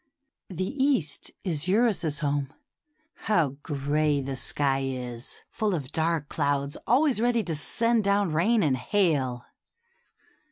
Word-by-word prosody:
The 185 0 -3 0.2
East 230 - 0
is 165 -3 -1
Eurus's 195 -7 +2
home. 140 -1 -1 0.8
How 170 -9 +3
gray 145 0 0
the 135 0 -4
sky 135 +1 +1
is, 125 -2 -5
full 210 -3 0
of 140 -4 -5
dark 160 -2 0
clouds 145 -2 -1
always 260 -2 +3
ready 235 -1 +2
to 170 - -2
send 230 +9 +1
down 200 -4 +2
rain 210 +7 +3
and 135 -4 +2
hail 130 -5 0
155 Hz, 125 wpm, -27 LUFS, 140-205 Hz, 0.8 s, How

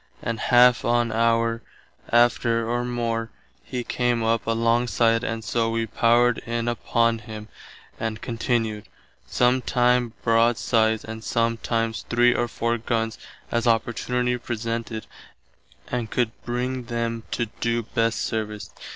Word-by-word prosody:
About 115 -1 -2
half 125 0 +6
on 120 -1 +2
hour 115 0 +1 0.5
after 120 -1 +3
or 120 +1 0
more 115 -2 -2 0.3
he 125 -2 -4
came 120 -1 0
up 115 0 0
alongside 115 0 +2
and 115 -1 -3
soe 115 +1 0
wee 115 0 0
powered 120 +2 +3
in 115 0 -3
upon 115 -1 +1
him 110 -1 -9 0.5
and 110 -1 -3
continued, 115 -3 -2 0.4
some 125 +1 +2
time 125 -1 +2
broadsides 115 -1 +2
and 110 0 -7
sometimes 115 -1 -1
three 120 0 +4
or 120 - 0
four 115 0 -1
gunns 115 -1 -2 0.3
as 120 0 0
opportunity 125 +2 +1
presented 115 -1 -4 0.8
and 120 -3 -2
could 120 -3 0
bring 125 +1 -2
them 115 -1 -2
to 120 - -1
doe 115 0 0
best 115 +1 0
service. 105 -2 -3
115 Hz, 125 wpm, -24 LUFS, 115-120 Hz, 0.8 s, half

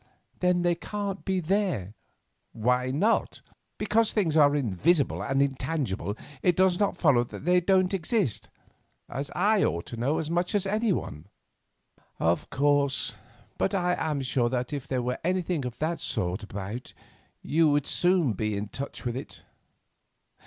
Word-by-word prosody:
"Then 180 -1 +2
they 175 0 +3
can't 200 +2 -4
be 190 -1 0
there." 175 - -1 0.6
"Why 125 +3 +1
not? 195 - +1 0.3
Because 215 +1 +2
things 175 -8 +1
are 145 -2 +5
invisible 140 - +1
and 135 +1 +2
intangible 130 - -2 0.2
it 180 - +3
does 185 -1 +3
not 205 -1 +1
follow 140 -7 +4
that 135 - -10
they 180 0 +4
don't 185 +1 +3
exist, 185 - 0 0.6
as 140 +1 -4
I 205 +2 +3
ought 85 0 -1
to 120 - -7
know 135 +7 0
as 160 - -2
much 175 +4 0
as 200 -1 +2
anyone." 195 - -1 0.9
"Of 85 +1 0
course; 140 -3 +1 0.5
but 195 - +1
I 180 -1 +1
am 150 -3 -2
sure 125 -2 +1
that 125 +3 -2
if 140 -1 -4
there 130 -2 -1
were 125 +1 -2
anything 180 -4 0
of 125 -1 -5
that 165 +2 -1
sort 90 +2 -1
about 105 +3 -7 0.5
you 160 +1 +3
would 145 -1 +2
soon 175 - +2
be 105 +1 -2
in 105 0 -4
touch 140 +2 -6
with 120 -1 -1
it. 130 - -7
145 Hz, 155 wpm, -27 LUFS, 125-180 Hz, 0.9 s, are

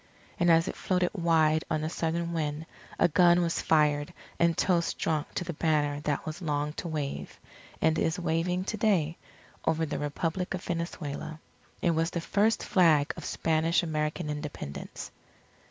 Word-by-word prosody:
And 175 - +3
as 165 0 +5
it - - -3
floated 180 -1 0
wide 160 -4 +3
on 155 -1 0
the 155 - -1
southern 170 0 -1
wind, 155 -1 -2 0.3
a - - +5
gun 175 +1 +5
was 170 - 0
fired 150 -1 +2 0.3
and 170 -1 +3
toasts 175 -2 +2
drunk 155 -2 -1
to - - -1
the 175 0 -4
banner 150 -2 +1
that 145 -1 -2
was 155 +3 -5
long 150 -2 -1
to - - -6
wave 150 -4 -4 0.4
and 160 0 +3
is 160 +3 +1
waving 175 +2 0
to 215 +3 -3
day 185 -7 +1 0.4
over 160 0 +1
the 150 - -3
Republic 165 +5 -2
of 180 - -7
Venezuela. 160 -2 -4 0.4
It 175 - +4
was 165 0 +1
the 175 - -3
first 210 +6 +1
Flag 160 -6 +4
of - - -8
Spanish 165 +2 +1
American 155 0 -2
Independence. 150 - -6
165 Hz, 165 wpm, -29 LUFS, 150-175 Hz, 0.4 s, as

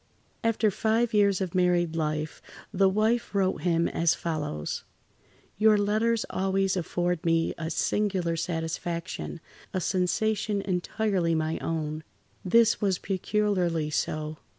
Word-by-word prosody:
After 225 -2 +2
five 225 +3 +1
years 200 -2 +3
of 185 -3 -2
married 175 -2 +2
life 155 -1 -2 0.3
the 195 0 +4
wife 220 +3 +1
wrote 190 -1 +1
him 170 -1 +2
as 170 -1 +2
follows: 150 - -3 0.8
"Your 215 0 +6
letters 215 +3 +1
always 195 0 +1
afford 175 -1 -1
me 165 -1 +2
a 160 -1 -3
singular 185 0 0
satisfaction, 170 +1 -3 0.4
a - - +2
sensation 200 +3 0
entirely 185 -2 0
my 160 0 -1
own. 155 -1 -3 0.4
This 230 +4 +4
was 195 -3 +2
peculiarly 185 -5 0
so. 155 0 -2
180 Hz, 120 wpm, -27 LUFS, 165-205 Hz, 0.8 s, Your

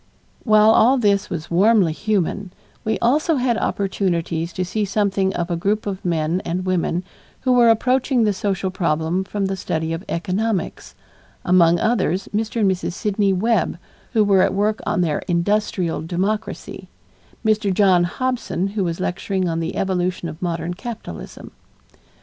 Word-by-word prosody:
While 215 -1 +5
all 245 +4 +5
this 205 -4 +1
was 170 -3 -5
warmly 190 -1 +4
human, 200 0 -1 0.3
we 220 - 0
also 300 +7 +2
had 250 -3 +1
opportunities 175 -5 -1
to 185 - -2
see 210 +4 -2
something 195 -1 0
of 175 +1 -2
a - - +1
group 205 +5 -1
of 195 -2 -4
men 170 +1 0
and 180 +2 -3
women 180 -1 0 0.4
who 255 - +1
were 240 -2 +5
approaching 250 +2 +2
the 210 -2 +2
social 190 -1 -2
problem 170 0 0
from 200 +1 -3
the 195 0 -1
study 160 -3 -2
of 165 +3 -5
economics; 190 +3 -2 0.5
among 175 -1 +5
others 190 -5 0
Mr. 220 +1 -1
and 195 -2 +4
Mrs. 185 -1 -3
Sidney 205 0 0
Webb 205 0 +1 0.4
who 220 -3 +4
were 195 -2 +4
at - - +2
work 210 +2 +1
on - - +1
their 160 -4 0
Industrial 180 -1 0
Democracy; 195 +7 -3 0.6
Mr. 215 -2 +2
John 185 -2 +4
Hobson 200 -4 -2
who 200 0 -2
was 170 -1 -2
lecturing 185 +1 -2
on 165 -1 -1
the 165 0 -3
evolution 180 -2 -1
of 155 0 -9
modern 170 -1 -2
capitalism. 205 - -8
190 Hz, 155 wpm, -21 LUFS, 175-215 Hz, 0.6 s, While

